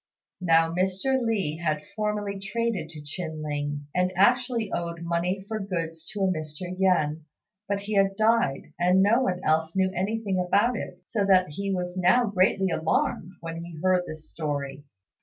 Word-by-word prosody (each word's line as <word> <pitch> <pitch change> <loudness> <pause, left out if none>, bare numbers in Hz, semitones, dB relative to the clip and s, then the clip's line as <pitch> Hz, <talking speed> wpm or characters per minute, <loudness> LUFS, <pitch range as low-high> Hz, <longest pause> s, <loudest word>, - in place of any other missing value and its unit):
Now 165 -2 +4
Mr. 190 +8 +1
Li 200 -9 0
had 155 -3 -1
formerly 210 -2 -2
traded 215 -4 -2
to 155 -2 -9
Chin 155 +1 -5
ling, 145 -1 -3
and 180 0 +2
actually 240 +2 +2
owed 170 0 -3
money 175 +3 -1
for 220 0 -3
goods 165 -4 -4
to 210 - -5
a 190 - +3
Mr. 165 +1 -4
Yen; 160 -5 +1 0.4
but 200 0 -1
he 210 +2 -4
had 195 -1 +3
died, 220 -11 +2
and 180 +2 +4
no 225 +5 +4
one 185 -8 0
else 160 +2 +1
knew 190 -1 +2
anything 195 +1 -1
about 205 +7 +2
it, - - -6
so 210 -3 -1
that 185 -4 +5
he 200 +6 -3
was 180 -1 -2
now 215 +7 +4
greatly 190 -2 +2
alarmed 165 +2 0
when 165 0 -5
he 170 -1 -9
heard 185 -1 +3
this 155 0 -8
story. 145 -2 -4
185 Hz, 170 wpm, -26 LUFS, 165-200 Hz, 0.4 s, that